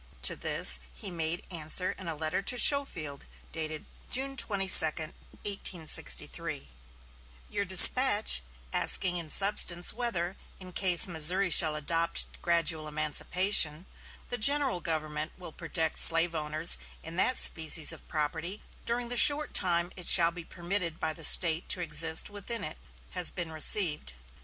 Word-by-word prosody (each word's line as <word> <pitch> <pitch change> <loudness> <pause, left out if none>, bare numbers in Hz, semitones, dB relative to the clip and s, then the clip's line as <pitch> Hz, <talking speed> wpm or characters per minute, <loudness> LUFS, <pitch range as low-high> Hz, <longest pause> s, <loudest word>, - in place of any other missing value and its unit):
To - - +6
this 65 -1 +2
he 65 - -7
made 165 0 -3
answer 170 +2 -3
in 190 - -13
a 165 - -5
letter 155 +4 -5
to 245 +5 +1
Schofield 180 - +2 0.2
dated 155 -1 -6 0.2
June 270 +2 -1
22, 200 -6 +1
1863: 160 - -5 0.8
"Your 200 - -5
despatch, 205 - +6 0.3
asking 180 -1 +1
in 165 -2 -7
substance 180 -2 -1
whether, 195 -6 -6 0.2
in 185 -1 -14
case 180 -2 +4
Missouri 180 +3 0
shall 155 0 +4
adopt 165 +3 -3
gradual 165 -2 -3
emancipation, 155 +2 0 0.4
the 245 - -6
general 275 -3 +1
government 155 -2 -6
will 180 -3 -12
protect 160 0 -2
slave 165 +1 +6
owners 155 +1 +1 0.2
in 165 +1 -11
that 255 +6 0
species 160 -1 +1
of - - -15
property 160 +6 -7 0.2
during 235 0 -5
the 245 - -6
short 295 +4 +4
time 175 -1 -1
it 180 -2 -7
shall 170 -2 +4
be 170 0 -12
permitted 175 -1 -6
by 160 0 -4
the 160 - -9
State 165 +1 +1
to - - +2
exist 160 -1 -1
within 205 +2 -9
it, 155 - -9 0.3
has 180 -2 -1
been 175 -3 -7
received. 155 - 0
170 Hz, 140 wpm, -26 LUFS, 155-195 Hz, 0.8 s, To